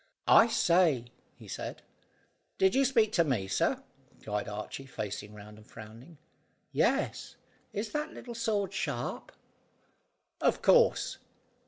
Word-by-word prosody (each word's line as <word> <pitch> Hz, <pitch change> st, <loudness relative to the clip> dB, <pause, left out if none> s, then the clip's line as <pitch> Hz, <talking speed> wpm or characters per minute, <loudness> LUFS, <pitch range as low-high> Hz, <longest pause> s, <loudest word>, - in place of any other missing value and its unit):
"I 225 Hz, -, +7 dB
say," 170 Hz, -, +3 dB, 0.3 s
he -, -, -14 dB
said. -, -, -6 dB, 0.7 s
"Did 190 Hz, 0 st, +3 dB
you 270 Hz, +1 st, +3 dB
speak 230 Hz, -5 st, +3 dB
to 170 Hz, -, +3 dB
me, 125 Hz, -11 st, -1 dB
sir?" 95 Hz, -, 0 dB, 0.4 s
cried 105 Hz, -1 st, -3 dB
Archy, 105 Hz, +6 st, -6 dB
facing 105 Hz, -3 st, -6 dB
round, 105 Hz, +1 st, -12 dB
and 110 Hz, -, -18 dB
frowning. 115 Hz, +10 st, -12 dB, 0.5 s
"Yes. -, -, 0 dB, 0.4 s
Is 210 Hz, +2 st, -4 dB
that 300 Hz, +1 st, -3 dB
little 240 Hz, -, -9 dB
sword 210 Hz, -4 st, -1 dB
sharp?" -, -, -3 dB, 1.1 s
"Of -, -, +1 dB
course." -, -, +4 dB
170 Hz, 125 wpm, -30 LUFS, -, 1.1 s, I